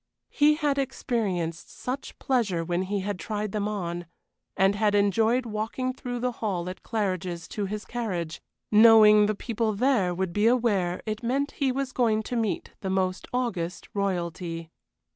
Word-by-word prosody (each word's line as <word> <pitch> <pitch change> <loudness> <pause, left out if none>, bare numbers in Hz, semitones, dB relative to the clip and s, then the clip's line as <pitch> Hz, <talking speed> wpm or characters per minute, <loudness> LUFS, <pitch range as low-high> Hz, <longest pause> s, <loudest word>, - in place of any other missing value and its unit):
He 300 0 +4
had 295 -2 0
experienced 190 -11 -2
such 260 +2 -5
pleasure 210 -11 0
when 175 +1 0
he 195 +1 -2
had 200 -1 -3
tried 210 -1 -3
them 210 0 -1
on, 175 -4 -4 0.5
and 195 +1 +4
had 205 0 +2
enjoyed 220 +5 +3
walking 225 +4 -2
through 245 -2 -5
the 250 0 0
hall 195 -7 -3
at 185 - -8
Claridge's 185 -6 -2
to 205 -2 -3
his 210 +2 -5
carriage, 185 -9 -3 0.3
knowing 215 -1 +8
the 215 - 0
people 225 0 -1
there 225 -5 +2
would 185 -1 -2
be 210 +3 +3
aware 205 -8 +1
it 215 0 -3
meant 275 +4 0
he 270 -2 0
was 270 0 -2
going 220 -4 +1
to 245 - -4
meet 225 -4 -1
the 190 - -3
most 190 0 -1
august 190 -9 -2
Royalty. 170 -4 -3
210 Hz, 160 wpm, -27 LUFS, 185-240 Hz, 0.5 s, knowing